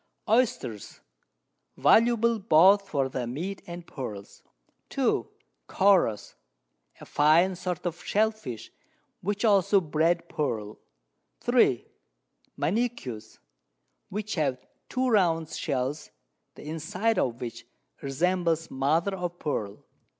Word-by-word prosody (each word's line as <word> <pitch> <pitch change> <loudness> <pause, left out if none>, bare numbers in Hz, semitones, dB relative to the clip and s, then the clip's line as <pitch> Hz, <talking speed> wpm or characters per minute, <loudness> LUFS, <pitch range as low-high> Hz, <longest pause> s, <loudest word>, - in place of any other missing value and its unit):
Oisters, 225 - 0 0.8
valuable 235 0 +4
both 195 +2 +5
for 140 -3 0
their 130 -2 -4
Meat 175 +11 -5
and 175 0 -8
Pearls. 105 -11 -8 0.5
2. - - 0 0.4
Choros, 185 - +2 0.7
a - - -11
fine 165 +6 +3
Sort 180 0 -4
of 175 0 -4
Shell 220 +2 +2
fish, 130 - -9 0.5
which 205 +4 -1
also 200 -1 +4
breed 165 +1 0
Pearl. 110 -8 -3 0.6
3. - - +3 0.7
Manegues, 165 - -2 0.7
which 210 +2 -4
have 135 -7 -1 0.2
2 255 0 0
round 170 -8 +2
Shells, 135 0 -3 0.5
the - - -12
inside 180 +8 -1
of 120 -2 -1
which 120 -3 -7 0.3
resembles 165 +3 0
Mother 160 +9 +1
of 175 -1 -4
Pearl. 105 -11 -4
170 Hz, 105 wpm, -27 LUFS, 135-200 Hz, 0.8 s, both